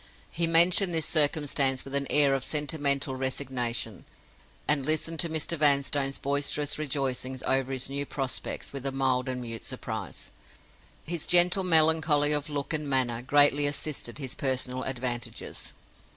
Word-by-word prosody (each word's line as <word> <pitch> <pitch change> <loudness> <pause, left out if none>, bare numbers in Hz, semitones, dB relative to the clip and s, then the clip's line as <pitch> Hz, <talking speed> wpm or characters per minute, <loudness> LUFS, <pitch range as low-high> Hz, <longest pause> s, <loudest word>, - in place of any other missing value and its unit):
He 170 0 -1
mentioned 175 +2 +4
this 160 -2 0
circumstance 145 -3 +3
with 135 - -10
an 140 -1 0
air 145 -2 +4
of 135 -2 -2
sentimental 145 -2 -1
resignation; 125 -5 -3 0.6
and 145 -2 +1
listened 155 +2 0
to 170 - +2
Mr. 160 +1 -1
Vanstone's 140 -1 +2
boisterous 145 +1 -1
rejoicings 130 -3 -3
over 135 0 -1
his 130 -1 0
new 140 +1 -3
prospects 135 0 -4
with 140 0 -5
a - - -2
mild 130 -1 -1
and 125 -1 -4
mute 115 -1 -7
surprise. - - -7 0.7
His 170 -1 -2
gentle 180 +2 +5
melancholy 160 -3 +3
of 150 0 -1
look 145 +1 -5
and 150 -2 -3
manner 125 -3 -1
greatly 145 +2 +4
assisted 145 -4 -2
his 135 -3 -4
personal 130 -2 -2
advantages. 125 -2 -5
140 Hz, 145 wpm, -26 LUFS, 130-150 Hz, 0.7 s, gentle